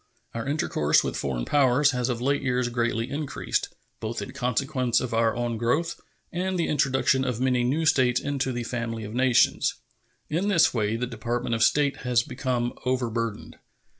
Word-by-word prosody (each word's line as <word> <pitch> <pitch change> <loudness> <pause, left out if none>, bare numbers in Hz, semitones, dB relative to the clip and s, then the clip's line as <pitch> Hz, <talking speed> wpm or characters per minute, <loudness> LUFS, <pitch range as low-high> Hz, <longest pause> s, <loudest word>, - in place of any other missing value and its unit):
Our 115 +2 -4
intercourse 140 - +2
with - - -3
foreign 60 -3 -2
powers 140 0 +3
has 125 -1 -1
of 120 -2 -1
late 140 +3 +1
years 125 -2 0
greatly 120 0 -1
increased, 145 0 -2 0.3
both 110 +1 -4
in 130 - -6
consequence 125 -1 0
of 125 -2 -4
our 115 0 +2
own 120 -1 -2
growth 145 +9 0 0.3
and 185 +2 -2
the 170 - 0
introduction 135 -2 +2
of 125 -3 -2
many 125 -1 +2
new 145 +7 0
states 130 -5 +3
into 140 -2 -2
the 120 -1 -3
family 115 -2 -4
of 105 +1 -7
nations. 125 0 +3 0.5
In 170 +6 -1
this 190 -6 +4
way 110 -2 0
the 120 +2 -1
Department 120 0 -3
of 115 - -1
State 140 +5 +3
has 125 -1 +1
become 125 -3 -2
overburdened. 115 -4 -2
125 Hz, 170 wpm, -26 LUFS, 115-140 Hz, 0.5 s, this